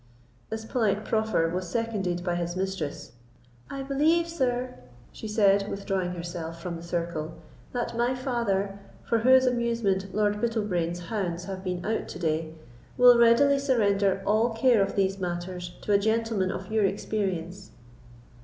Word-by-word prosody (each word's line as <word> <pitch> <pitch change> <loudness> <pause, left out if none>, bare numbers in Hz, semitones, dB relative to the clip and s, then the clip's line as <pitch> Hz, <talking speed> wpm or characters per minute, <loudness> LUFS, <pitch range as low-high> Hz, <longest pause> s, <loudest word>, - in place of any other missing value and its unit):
This 220 0 -5
polite 215 -3 0
proffer 220 -6 +1
was 180 +1 -3
seconded 195 -5 -2
by 175 -1 -1
his 175 0 -2
mistress. 190 -5 -4 0.6
"I 275 -1 -5
believe, 310 +5 +2
sir," 255 -6 -1 0.4
she 220 - -8
said, 200 -1 +3
withdrawing 195 -3 -2
herself 170 -1 -6
from 170 0 -5
the 165 - -8
circle, 170 -2 -3 0.4
"that 240 -1 -3
my 240 +2 +1
father, 205 -6 -1 0.2
for 230 - +1
whose 260 +3 +6
amusement 230 -6 0
Lord 210 +1 0
Bittlebrain's 185 -7 -1
hounds 175 -2 -3
have 190 -1 -6
been 180 -2 -3
out 220 +1 -1
to - - -7
day, 160 -1 -2 0.4
will 245 -1 +8
readily 275 +5 +5
surrender 205 -8 +2
all 215 +3 +3
care 235 -2 +4
of 195 0 0
these 195 0 +1
matters 175 0 -4
to 205 - +1
a 200 - +5
gentleman 220 -2 0
of - - -6
your 220 -1 +2
experience." 195 -2 -2
200 Hz, 150 wpm, -27 LUFS, 180-230 Hz, 0.6 s, will